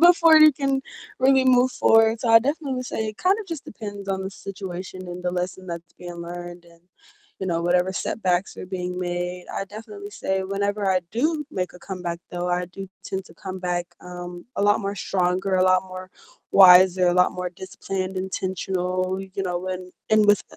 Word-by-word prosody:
before 335 -2 +7
you 310 -1 +8
can 270 0 -1 0.4
really 265 0 +4
move 255 0 +5
forward, 225 0 +4
so 240 - -1
I 225 0 +9
definitely 285 +1 -2
would 255 0 -3
say 220 -2 -3
it 215 - -7
kind 375 +2 +3
of 415 - -8
just 330 -5 -6
depends 205 -2 -8
on 190 0 -1
the 190 - -4
situation 185 -1 -7
and 175 0 -7
the 180 - +1
lesson 185 +1 -4
that's 170 -1 -7
being 175 -1 -8
learned 175 0 -8
and, 170 0 -20 0.6
you 190 - -4
know, 170 -2 0
whatever 180 +2 +2
setbacks 185 -1 -1
are - - -5
being 180 -1 -4
made. 180 0 -3
I 195 - -3
definitely 205 0 -9
say 190 -1 -2
whenever 200 +1 -1
I 185 -1 +3
do 300 +5 0
make 180 -6 -3
a - - -11
comeback 175 -2 -5
though, 175 0 -3
I 180 0 0
do 195 +2 -9 0.2
tend 190 0 -4
to 165 - -16
come 190 +1 -7
back, 175 -1 -2
um, 175 0 -8
a - - 0
lot 205 +2 +4
more 200 0 -3
stronger, 185 +1 0
a 185 - +3
lot 185 0 +4
more 185 0 -9 0.4
wiser, 185 -1 +8
a - - +3
lot 180 0 +4
more 180 -1 -4
disciplined, 190 +1 -5
intentional, 185 0 -2
you 195 +1 -5
know, 180 -2 -1
when, 185 0 -5 0.2
in 215 0 +5
with 205 -1 +5
185 Hz, 200 wpm, -24 LUFS, 180-205 Hz, 0.6 s, I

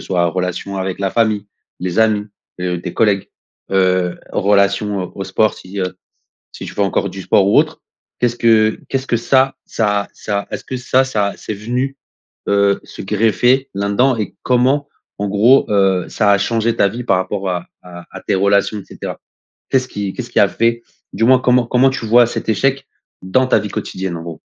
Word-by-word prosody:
soit 90 -2 +1
relation 90 +2 -3
avec 95 0 -3
la 95 -1 0
famille, 110 -2 +1 0.3
les 90 +2 -2
amis, 105 -2 +2 0.3
heu, 90 -1 -2
tes 90 - -6
collègues, 105 -3 +1 0.4
heu, 90 -2 +2
relation, 100 0 +2
heu, 90 - -5
au 95 - -5
sport, 105 +3 +1
si, 95 +2 -9
heu, 90 0 -3 0.6
si - - -8
tu - - -8
fais - - -3
encore 100 0 0
du 95 +1 -8
sport 95 +1 +3
ou - - +5
autre, - - 0 0.4
qu'est-ce 120 -1 +1
que 110 -2 +3
qu'est-ce 135 0 -2
que 120 - +2
ça 135 +2 +2
ça 105 -2 0
ça 100 -1 -3
est-ce - - -5
que 130 - -5
ça 130 +1 +2
ça 105 -6 -1
c'est 110 - -6
venu, 125 +6 -3 0.5
heu, 100 0 +2
se - - -9
greffer 115 +6 +2
là-dedans? 100 +6 +1
Et 105 -4 -4
comment, 130 +3 +2 0.3
en 100 - -2
gros, 110 +7 +4
heu, 95 -3 +2
ça 105 -2 +1
a 100 - +4
changé 115 +2 0
ta 100 - +3
vie 120 +4 -6
par - - +2
rapport 95 0 -2
à 90 -1 -3 0.2
à 85 -1 -11
à - - -8
tes - - 0
relations, 100 +2 +2
et - - -13
cetera? - - -7 0.5
Qu'est-ce 130 -1 +1
qui 100 -4 -4
qu'est-ce - - -7
qui - - +2
a - - +6
fait 115 +1 0 0.3
du 100 +4 -1
moins, 130 +1 +6
comment 125 0 +3
comment 125 +2 +4
tu 130 -3 -4
vois 120 +2 +5
cet 115 - -4
échec 135 +5 0 0.4
dans 130 +8 +2
ta - - +4
vie 105 0 -5
quotidienne 95 -2 -4
en - - -7
gros? 85 -2 -8
105 Hz, 200 wpm, -17 LUFS, 95-120 Hz, 0.6 s, a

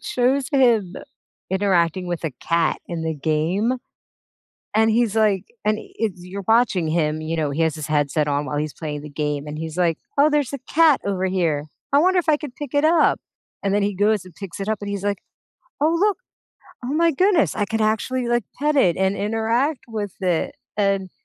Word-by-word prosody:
it - - -20
shows 255 +2 +1
him 235 - +3 0.6
interacting 185 -2 +1
with 175 -1 -3
a 160 - 0
cat 165 -1 +1
in 170 -2 -4
the 160 -1 -1
game, 165 - 0 1.0
and 220 0 +4
he's, 225 -1 +2
like, 210 -4 +2 0.2
and 215 0 +2
it's 200 -6 -4
you're 195 +2 -7
watching 220 -8 +3
him, 155 -1 0
you 160 +1 -3
know, 155 -3 0
he 155 +4 -1
has 160 -1 +1
his 155 - -5
headset 150 0 +1
on 145 0 0
while 145 - -4
he's 150 0 -2
playing 150 -2 -5
the 150 - -8
game, 150 0 -2
and 150 0 -6
he's 160 +1 -5
like, 170 -3 +1 0.2
"Oh, 300 +2 +6
there's 290 -3 +1
a 280 - -3
cat 315 -3 +5
over 190 -1 0
here. 165 -6 0 0.3
I 280 - +6
wonder 365 +3 +4
if 345 - -1
I 305 - +5
could 295 -4 -9
pick 290 -2 -7
it 285 +1 +3
up," 325 0 +4 0.4
and 195 - 0
then 205 - +2
he 205 - -1
goes 205 0 +2
and 180 -3 -14
picks 195 -2 -8
it 195 +1 -4
up 220 - 0
and 205 - -5
he's, 200 0 -4
like, 200 -1 0 0.6
"Oh 315 +2 +3
look, 415 0 +2 0.7
oh, 255 - -2
my 335 +1 +4
goodness, 360 +1 +2
I 205 - +1
could 220 +2 -2
actually, 235 +4 0
like, 240 -2 +1
pet 295 +1 +1
it 180 -11 +4
and 190 +1 +1
interact 225 +7 0
with 210 -4 -4
it," 175 -3 0 0.2
and 195 -2 +1
200 Hz, 210 wpm, -22 LUFS, 165-245 Hz, 1.0 s, Oh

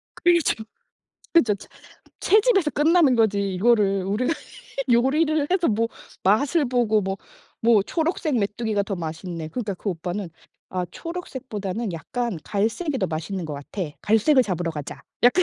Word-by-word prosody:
그렇죠. 340 -10 +2 0.7
그쵸. 235 - +5
채 200 - -12 0.5
채집에서 405 -6 +4
끝나는 300 -2 +4
거지 200 -3 +2
이거를 200 -2 +3
우리가 220 +10 0 0.6
요리를 295 +5 +3
해서 365 -2 +2
뭐 230 +1 +1 0.3
맛을 280 - +3
보고 240 -4 +2
뭐 195 0 -2 0.4
뭐 225 -3 +5
초록색 320 - -1
메뚜기가 210 0 -1
더 195 - -3
맛있네. 165 -1 -5
그러니까 210 -1 -3
그 200 - -5
오빠는 180 +2 -3 0.4
"아 180 -1 -2
초록색보다는 235 - -5
약간 210 - -3
갈색이 225 - -1
더 - - 0
맛있는 170 +3 -3
것 155 - -5
같아. 145 +7 -5 0.2
갈색을 240 +5 +4
잡으러 175 -3 -2
가자." 150 -3 -7 0.2
약간 300 +10 +6
220 Hz, 315 characters per minute, -24 LUFS, 195-285 Hz, 0.7 s, 약간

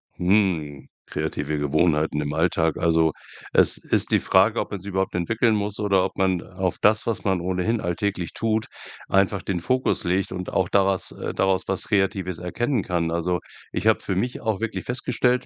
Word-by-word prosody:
Hm, 90 -7 0 0.2
kreative 75 +1 -3
Gewohnheiten 75 +1 +1
im 75 0 -3
Alltag. 80 -1 +1
Also 80 -1 +3 0.4
es - - +6
ist - - 0
die - - +4
Frage, 105 +4 +3
ob - - -3
man's 100 -2 -6
überhaupt 95 -1 -2
entwickeln 110 +5 +1
muss 105 0 -3
oder 100 -3 +2
ob 95 - -6
man 95 -2 +1
auf 95 -1 -3
das, 110 +1 +4
was 115 -2 -1
man 95 -2 +1
ohnehin 95 +6 -1
alltäglich 90 0 -2
tut, 110 -1 0 0.4
einfach 100 0 +2
den 95 -3 -2
Fokus 130 +8 0
legt 95 +1 0
und 90 -1 -5
auch 95 -1 0
da 100 -2 +3
was, 95 -1 -1
äh - - -5
daraus 95 -1 +1
was - - -1
Kreatives 95 -3 0
erkennen 120 +6 -1
kann. 85 -2 -1
Also 85 +1 0 0.3
ich - - -3
habe - - +4
für 95 - -3
mich 120 +7 -2
auch 110 -4 -1
wirklich 115 -1 -4
festgestellt, 125 0 0
95 Hz, 185 wpm, -24 LUFS, 85-105 Hz, 0.4 s, es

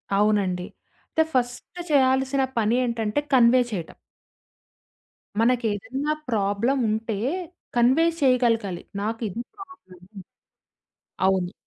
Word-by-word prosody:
అవునండి. 195 -3 +1 0.4
అంటే 320 - +3
ఫస్ట్ 250 +7 -2
చేయాల్సిన 265 0 +3 0.2
పని 225 +1 +2
ఏంటంటే 230 +1 -1
కన్వే 250 0 +6
చేయటం. 170 -6 -5 1.4
మనకేదన్నా 245 +4 0 0.2
ప్రాబ్లముంటే 220 +1 0 0.6
కన్వే 260 +8 +4 0.2
చేయకలగాలి. 230 -8 +2 0.2
నాకిది 225 0 -3
ప్రాబ్లమ్ 370 - -14 1.3
అవును. 190 -1 +1
230 Hz, 75 wpm, -24 LUFS, 205-260 Hz, 1.4 s, కన్వే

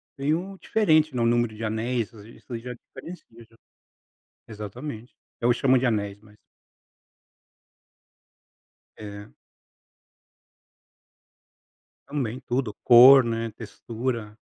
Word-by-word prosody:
tem 145 +3 0
um 190 +3 -6
diferente, 155 -11 +2
né, 120 - 0
o - - +2
número 120 -1 +1
de 110 - -7
anéis, 115 +2 -2
isso 115 +2 -10
já 125 +2 -7
diferencia 175 +8 -12 0.2
já. 115 - -26 0.9
Exatamente. 115 +3 -8 0.3
Eu 120 +1 +3
chamo 130 +2 +3
de 130 - +1
anéis, 100 -3 -2
mas 105 -1 -20 2.6
É. 105 0 -10 2.7
Também, 130 -5 -3
tudo, 120 -3 -1
cor, 125 +2 +9
né, 115 0 -2
textura 115 0 -6
120 Hz, 100 wpm, -25 LUFS, 110-130 Hz, 2.7 s, cor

